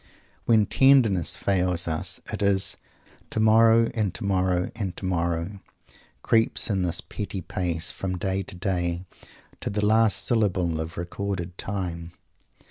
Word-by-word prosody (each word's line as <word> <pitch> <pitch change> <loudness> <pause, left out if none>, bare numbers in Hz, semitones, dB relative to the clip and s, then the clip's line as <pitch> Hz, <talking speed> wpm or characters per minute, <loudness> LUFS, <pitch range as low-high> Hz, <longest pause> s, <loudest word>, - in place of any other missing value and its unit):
When 110 -3 +4
tenderness 120 - +4
fails 90 -3 0
us, 80 -1 -3
it - - -4
is 100 -1 +1 0.5
"Tomorrow 115 +1 +4
and 105 -4 0
tomorrow 95 -2 0
and 100 -6 -4
tomorrow, 85 +1 -2 0.6
creeps 115 -1 +3
in 95 -2 0
this 90 -1 0
petty 100 -2 -6
pace 85 -2 -2
from 90 -1 -4
day 95 +2 -1
to 95 0 -9
day 90 -1 -2 0.5
to - - -4
the 105 +1 -1
last 110 0 +3
syllable 90 -8 +1
of 80 +1 -5
recorded 90 0 -4
time." 90 -4 -5
95 Hz, 130 wpm, -25 LUFS, 85-105 Hz, 0.6 s, When